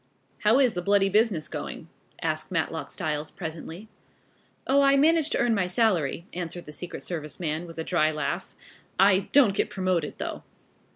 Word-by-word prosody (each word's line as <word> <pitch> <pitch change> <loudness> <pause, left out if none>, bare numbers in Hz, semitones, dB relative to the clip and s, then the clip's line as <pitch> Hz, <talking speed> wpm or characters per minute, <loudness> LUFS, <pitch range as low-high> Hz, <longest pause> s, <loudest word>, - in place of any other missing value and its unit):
"How 215 +4 +4
is 260 -4 +4
the 180 - -3
bloody 200 +1 +3
business 205 -6 +2
going?" - - -6 0.4
asked - - -2
Matlock - - -2
Styles 150 0 -3
presently. 165 +4 -7 0.8
"Oh, 280 +1 +4
I 275 0 +5
manage 315 +1 +4
to - - 0
earn 240 -1 +2
my 195 -4 +1
salary," 180 - +1
answered 175 0 -5
the 150 - -9
secret 175 +4 -4
service 155 -4 -4
man, 160 0 -2
with 165 - -11
a 160 - -2
dry 160 -2 +2
laugh. 155 -2 -3 0.4
"I 195 0 +4
don't 260 -8 +5
get - - 0
promoted 185 -5 -1
though." - - -5
180 Hz, 170 wpm, -26 LUFS, 160-220 Hz, 0.8 s, I